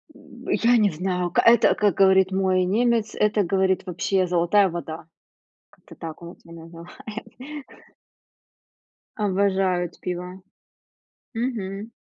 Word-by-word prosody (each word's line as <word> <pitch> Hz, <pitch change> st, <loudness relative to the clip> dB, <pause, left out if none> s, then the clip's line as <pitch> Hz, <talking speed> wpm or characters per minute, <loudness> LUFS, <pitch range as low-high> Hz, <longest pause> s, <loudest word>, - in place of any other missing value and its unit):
М, -, -, -15 dB
я 240 Hz, +1 st, +3 dB
не 210 Hz, -3 st, +3 dB
знаю, 180 Hz, +1 st, -2 dB
к -, -, +3 dB
это, 235 Hz, +1 st, +5 dB
как 205 Hz, -4 st, +1 dB
говорит 190 Hz, -1 st, +4 dB
мой 190 Hz, -1 st, +1 dB
немец, 230 Hz, +3 st, 0 dB
это, 210 Hz, 0 st, +1 dB
говорит, 190 Hz, +1 st, 0 dB
вообще 185 Hz, +1 st, -1 dB
золотая 180 Hz, +3 st, +3 dB
вода. 165 Hz, -2 st, -7 dB, 0.7 s
Как-то -, -, -18 dB
так 165 Hz, 0 st, -9 dB
он 170 Hz, +1 st, -10 dB
у 170 Hz, -, -17 dB
меня 165 Hz, -1 st, -11 dB
называет. 220 Hz, -, -10 dB, 1.5 s
Обожают 190 Hz, -4 st, 0 dB
пиво. 180 Hz, +1 st, -6 dB, 0.9 s
Мгм. 220 Hz, -3 st, -4 dB
190 Hz, 120 wpm, -23 LUFS, 180-210 Hz, 1.5 s, это